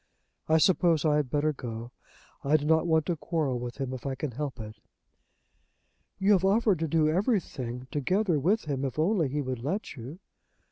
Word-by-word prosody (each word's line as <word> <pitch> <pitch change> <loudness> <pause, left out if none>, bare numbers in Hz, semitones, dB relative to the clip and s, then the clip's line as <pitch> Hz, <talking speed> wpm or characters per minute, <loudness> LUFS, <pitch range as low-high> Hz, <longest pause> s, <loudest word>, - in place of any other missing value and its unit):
I 160 - +5
suppose 165 -2 +3
I 150 -1 +3
had 145 -4 -1
better 150 +3 +1
go. 120 -2 -7 0.5
I 145 +3 +4
do 145 - -5
not 160 +2 +3
want 160 -2 +2
to 175 - 0
quarrel 150 -6 -1
with 120 0 -6
him 135 -2 -3
if 130 - -7
I 135 - -2
can 145 0 -4
help 140 +1 -5
it." 110 0 -8 1.4
"You 195 +3 +2
have 190 -3 +4
offered 200 -2 +3
to 165 - -1
do 155 0 +2
everything 155 - -1
together 180 +3 +1
with 190 +9 +1
him, 140 -3 -2
if 135 0 -3
only 165 -2 +2
he 145 +2 -1
would 130 -2 -4
let 190 +10 -3
you." 130 +6 -8
150 Hz, 190 wpm, -28 LUFS, 130-170 Hz, 1.4 s, I